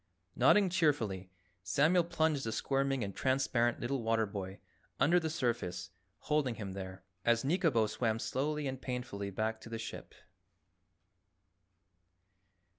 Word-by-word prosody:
Nodding 200 -3 +5
cheerfully, 125 - +1 0.3
Samuel 150 - +3
plunged 160 -4 +1
the 115 - -2
squirming 135 0 0
and 100 -1 -5
transparent 130 -3 +1
little 125 +2 -1
water 115 0 +2
boy 100 -1 -6 0.4
under 175 +4 +5
the 160 -2 -2
surface, 115 - -2 0.3
holding 150 -5 +1
him 100 -3 -5
there, 95 -1 -7 0.2
as 115 -1 +3
Nikobo 150 - +3
swam 110 +1 0
slowly 150 +6 -1
and 130 -1 -4
painfully 125 -6 -4
back 110 +3 -2
to - - -10
the 115 - -4
ship. 115 - -7
120 Hz, 125 wpm, -33 LUFS, 110-145 Hz, 0.4 s, Nodding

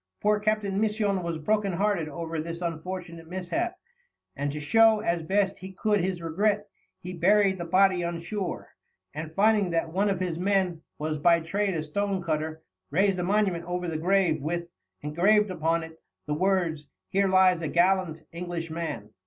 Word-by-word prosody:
Poor 210 0 +2
Captain 210 -2 0
Misson 210 -3 +1
was 170 -2 -3
broken 200 +4 0
hearted 190 -3 0
over 165 0 -4
this 170 +1 -5
unfortunate 170 0 -5
mishap, 185 - -2 0.6
and 145 0 -2
to 150 - -5
show 220 +8 +5
as 170 -5 0
best 195 +4 0
he 190 0 -9
could 210 +1 +1
his 180 -1 -2
regret, 205 +5 0 0.3
he 180 0 -8
buried 190 +2 +3
the 170 - -3
body 185 +1 +3
on 170 0 -3
shore, 195 +2 -4 0.4
and, 155 +1 -6
finding 210 -1 +3
that 165 -1 -1
one 200 +3 +2
of 195 -2 -1
his 175 -3 -2
men 185 -3 +1 0.2
was 155 0 -2
by 170 +2 +5
trade 195 +3 -1
a 155 - -2
stonecutter, 160 -3 -2 0.3
raised 190 +4 +2
a - - 0
monument 190 -3 +1
over 180 0 -3
the 165 - -3
grave 180 -3 +2
with, 170 +3 -3 0.3
engraved 195 +7 +3
upon 165 -1 0
it, 160 0 -12 0.2
the 150 - -2
words: 170 -3 0 0.2
"Here 195 +1 +2
lies 185 -2 +4
a 160 - -2
gallant 175 -1 +1
English 170 -1 -5
Man." 160 -11 -5
180 Hz, 170 wpm, -27 LUFS, 165-195 Hz, 0.6 s, show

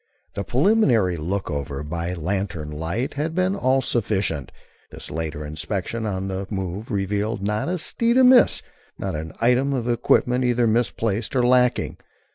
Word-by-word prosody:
The 100 - -3
preliminary 125 - +3
look 90 +5 -3
over 70 0 -4
by 85 +3 -3
lantern 85 -3 -3
light 85 - -3
had 155 +3 -3
been 185 +1 +1
all 135 -7 +2
sufficient. 95 - -1 0.4
This - - -9
later 80 -1 -4
inspection 100 +8 -3
on 95 -1 -2
the 95 0 -4
move 95 +2 -4
revealed 100 0 -1
not 105 +8 -1
a 180 - 0
steed 230 +8 0
amiss, 255 -1 +6 0.3
not - - -3
an 80 +1 -5
item 125 +4 +3
of 120 -3 -2
equipment 125 +1 +2
either 120 -1 +2
misplaced 115 -1 0
or 125 - +3
lacking. 125 0 +2
105 Hz, 150 wpm, -23 LUFS, 90-125 Hz, 0.4 s, amiss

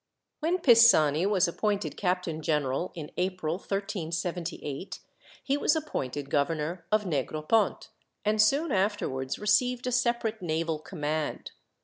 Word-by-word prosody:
When 335 +4 +1
Pisani 225 - +6
was 195 -4 +3
appointed 205 +3 -1
captain 180 -4 -1
general, 150 +1 -1
in 155 -3 -7
April, 180 -3 -1
1378, 175 -5 -4 0.5
he 280 +1 0
was 290 - +2
appointed 145 - -4
governor 155 +4 -1
of 215 -1 +2
Negropont, 155 - 0 0.4
and 215 0 +3
soon 280 +8 +2
afterwards 190 - -1
received 245 +4 +1
a 250 - -1
separate 235 -3 0
naval 160 -2 -1
command. 155 -2 -3
180 Hz, 115 wpm, -28 LUFS, 155-215 Hz, 0.5 s, Pisani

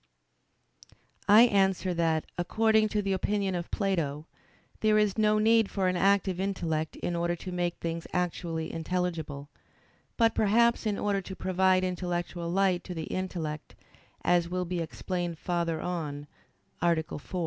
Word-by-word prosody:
I 215 +3 +9
answer 195 -4 +2
that, 165 -2 +1
According 220 +4 +2
to 210 0 -1
the 195 0 0
opinion 195 0 0
of 175 -1 -4
Plato, 160 -7 -1 0.5
there 215 -1 +3
is 210 -2 +2
no 215 -1 +3
need 225 0 +4
for 190 -2 0
an 185 - +1
active 190 0 +2
intellect 165 -5 -2
in 175 - -3
order 170 0 0
to 180 +2 -7
make 175 -1 -1
things 165 0 -4
actually 170 -2 -2
intelligible; 165 -4 -3 0.7
but 230 -1 +4
perhaps 235 +2 +3
in 205 -2 0
order 200 -1 0
to 190 +1 -8
provide 185 0 +2
intellectual 175 -1 -3
light 185 0 +2
to 180 - -6
the 160 -1 -5
intellect, 165 -5 -4 0.5
as 175 -1 +2
will 180 0 -2
be 180 0 -3
explained 175 +1 -3
farther 170 -1 -1
on 150 -5 -4 0.6
(A. 170 -2 +2
4). 155 - -7
180 Hz, 150 wpm, -29 LUFS, 170-195 Hz, 0.7 s, I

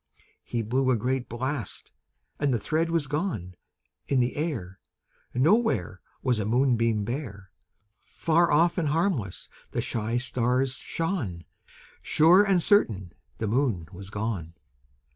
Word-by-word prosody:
He 115 -2 -2
blew 130 +4 +1
a 130 - +4
great 125 +2 -1
blast, 125 -1 -4 0.5
and 145 -1 +1
the 120 - +2
thread 160 +9 0
was 165 -3 +1
gone; 145 - -3 0.5
In 135 - +2
the 125 0 +1
air 115 - -3 0.6
Nowhere 130 - +2 0.2
Was 125 -4 +1
a 105 - -1
moonbeam 115 -3 +2
bare; 110 -6 -5 0.5
Far 170 +1 +1
off 170 +4 +3
and 160 - 0
harmless 150 - -1 0.3
the - - 0
shy 115 +1 -1
stars 125 +1 0
shone; 150 - -3 0.6
Sure 175 +6 +5
and 190 -4 +2
certain 100 - +2 0.2
the 110 - -2
Moon 110 - 0
was 95 +2 -9
gone. 100 -6 -4
125 Hz, 130 wpm, -27 LUFS, 105-155 Hz, 0.6 s, Sure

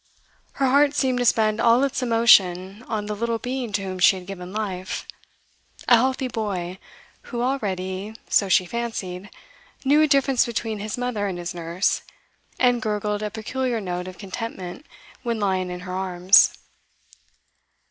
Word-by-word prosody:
Her 275 - 0
heart 280 +2 +4
seemed 260 -3 +1
to 245 - 0
spend 215 -2 +3
all 235 +3 +4
its 275 -1 -1
emotion 205 -5 +4
on 215 -2 -2
the 210 0 -3
little 230 +2 -1
being 250 -1 -4
to 200 - 0
whom 185 -1 -5
she 185 - +6
had 185 -1 -8
given 180 -1 -8
life 190 -3 -4 0.8
a 245 - +8
healthy 260 +2 0
boy, 190 -6 -4 0.5
who 240 -1 -2
already, 200 -5 -3
so 200 - +2
she 185 - +4
fancied, 205 -4 -5 0.6
knew 290 +3 +5
a 310 - +5
difference 275 -3 +3
between 225 -2 -3
his 210 +3 -4
mother 245 -5 -2
and 185 -3 -4
his 175 0 -5
nurse, 170 +2 -1 0.6
and 245 -2 +3
gurgled 210 -1 -2
a 210 - -2
peculiar 235 +3 -2
note 180 -2 -4
of 185 -1 -9
contentment 195 - -7 0.3
when 235 -2 -2
lying 190 -3 0
in 180 0 -6
her 180 0 -7
arms. 185 0 +4
210 Hz, 155 wpm, -23 LUFS, 185-240 Hz, 0.8 s, a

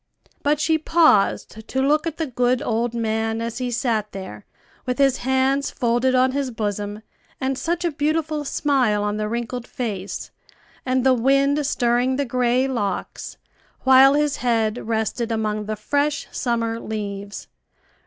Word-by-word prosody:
But 290 +1 +1
she 315 +1 +2
paused 310 -9 +2
to 265 - -2
look 300 +4 +2
at 320 - -4
the 325 - -1
good 250 -1 +1
old 235 +1 -1
man 225 0 -1
as 230 +2 -4
he 250 -1 -2
sat 230 -4 -1
there 105 - -8 0.4
with 250 - -1
his 275 -2 +3
hands 265 +2 +1
folded 245 +2 +1
on 255 +1 +4
his 275 -1 -2
bosom, 210 -2 -4 0.4
and 265 0 -1
such 335 +6 -2
a 340 - +1
beautiful 305 +1 -1
smile 260 -7 +1
on 205 0 -1
the 215 0 -2
wrinkled 235 +1 -4
face, 205 -6 -5 0.6
and 255 0 +1
the 265 0 +5
wind 275 +4 +2
stirring 245 0 +1
the 280 +1 -1
gray 250 +1 +1
locks, 205 -8 -4 0.4
while 265 +1 +7
his 295 -1 +1
head 230 -2 0
rested 230 +1 -1
among 215 -1 -1
the 215 +1 -3
fresh 285 +7 -1
summer 230 -2 -1
leaves. 205 -2 -6
245 Hz, 155 wpm, -22 LUFS, 220-275 Hz, 0.6 s, while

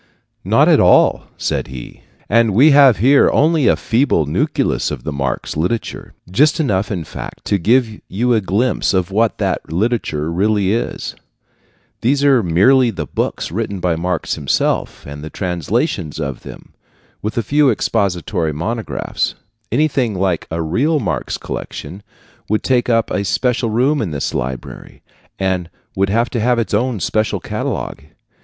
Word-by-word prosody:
"Not - - +3
at - - +5
all," - - +4
said - - -2
he; 65 -2 -10 0.3
"and 115 -2 +3
we 145 +7 +6
have 140 -5 +6
here 135 +8 +5
only 155 -2 +3
a - - +5
feeble 115 - +1
nucleus 75 - 0
of - - -6
the - - -3
Marx 70 -2 -3
literature 90 +9 -3 0.2
just 150 - +3
enough, 105 -10 0
in 90 -5 -2
fact, 75 - -9
to 100 - +1
give 110 +3 +1
you 120 +5 0
a 110 - +2
glimpse 105 +3 0
of 95 0 0
what 110 +3 +1
that - - -2
literature 85 -6 -1
really 100 +2 +1
is. 115 - -3 0.9
These 140 +4 +1
are 135 -4 +5
merely 110 +9 +4
the 85 -8 -4
books - - -3
written 100 0 -3
by 90 -2 0
Marx 85 0 -2
himself, 70 -4 -1
and 70 +1 -8
the 80 - -6
translations 90 - -2
of 70 -4 -4
them, - - -12 0.5
with 105 +1 -4
a 115 - +1
few 145 +2 +3
expository 90 -8 0
monographs. 110 +10 -3 0.4
Anything 130 -4 +1
like 95 -2 -1
a 80 0 -2
real 140 - +1
Marx 110 - -2
collection 90 +8 -7 0.5
would 110 +1 0
take 125 -2 +1
up 115 -1 +1
a 100 - 0
special 125 +2 0
room 130 +7 +1
in 105 - -2
this 75 -3 -3
library, 65 0 -6 0.3
and 95 -3 -1 0.3
would 95 0 +1
have 115 +4 +1
to 120 - -1
have 120 +2 +2
its 115 -2 -2
own 115 +1 0
separate 110 +5 -1
catalogue. - - -4
105 Hz, 160 wpm, -18 LUFS, 85-120 Hz, 0.9 s, we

